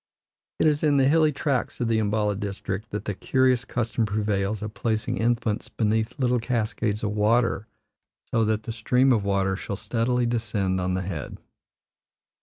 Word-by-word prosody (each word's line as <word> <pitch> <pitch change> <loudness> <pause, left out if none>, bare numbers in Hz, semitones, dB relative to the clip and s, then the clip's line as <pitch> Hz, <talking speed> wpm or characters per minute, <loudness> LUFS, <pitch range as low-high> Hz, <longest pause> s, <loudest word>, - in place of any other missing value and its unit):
It - - +2
is 150 -1 +3
in 145 -2 +3
the 135 -1 +4
hilly 155 +1 +4
tracts 135 -2 -1
of 120 - 0
the 115 -1 +2
Umballa 105 -1 +1
district 100 +1 -4
that 105 0 -5
the 105 - -2
curious 130 +4 +2
custom 115 -2 -1
prevails 105 0 -1
of 105 0 -5
placing 110 -2 -1
infants 115 -2 0
beneath 110 +3 0
little 125 -3 +2
cascades 110 -3 -1
of 105 - 0
water 110 +1 +2 0.6
so 115 - +2
that 110 0 0
the 115 - -5
stream 125 +4 +3
of 110 -4 +1
water 100 -1 +1
shall 100 - -5
steadily 120 +4 0
descend 105 -5 -1
on 90 0 0
the 95 - -2
head. 85 -5 -5
110 Hz, 170 wpm, -25 LUFS, 105-120 Hz, 0.6 s, the